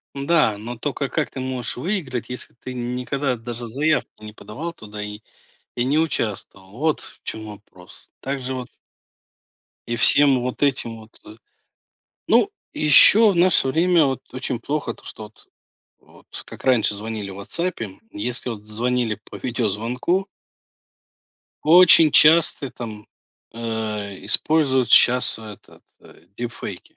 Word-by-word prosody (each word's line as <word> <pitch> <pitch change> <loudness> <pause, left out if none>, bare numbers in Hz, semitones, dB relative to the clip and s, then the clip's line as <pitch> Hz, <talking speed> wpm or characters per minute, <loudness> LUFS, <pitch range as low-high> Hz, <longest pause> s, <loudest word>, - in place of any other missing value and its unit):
Н-да, 140 -6 +2
но 120 +3 -7
тока 140 +2 -3
как - - -2
ты - - -7
можешь 130 -2 -4
выиграть, 130 - -3
если 125 - -8
ты 130 +2 -9
никогда 125 +2 -2
даже 120 +1 -7
заявку 130 -2 -1
не 105 - -8
подавал 140 +11 -7
туда 105 -7 -9
и 105 0 -7 0.6
и 120 - 0
не 145 +5 +1
участвовал, 100 -10 -3
вот 155 0 0
в - - -12
чём 110 0 -6
вопрос. 100 -4 -15
Так 135 +1 -3
же 130 0 -5
вот 125 -1 -6 1.2
И 120 - -2
всем 140 +2 +5
вот 125 +3 -3
этим 125 -5 0
вот, 110 +1 -17
э 105 - -12 0.9
Ну, - - +3 0.2
еще 200 +8 +6
в 175 - -5
наше 175 -6 +4
время 165 +2 +3
вот 135 -1 -2
очень 130 -2 -4
плохо 140 -2 -3
то, - - -20
что 110 - -9
вот 105 - -18 0.5
вот - - -22 0.2
как - - -12
раньше 120 -5 +2
звонили 105 -1 -5
в - - -9
"Ватсапе", 115 - -4 0.2
если 120 +4 -4
вот 105 -3 -8
звонили 115 0 -2
по - - -7
видеозвонку 125 - -1 1.4
очень 165 -1 +7
часто 155 -3 +5
там, 105 -3 -8 0.5
э, 110 -4 -5
используют 135 -6 +2
щас 125 0 +5
этот, 105 -3 -13 0.2
э, 80 - -19
дипфейки. 120 -1 -7
125 Hz, 140 wpm, -22 LUFS, 110-145 Hz, 1.4 s, очень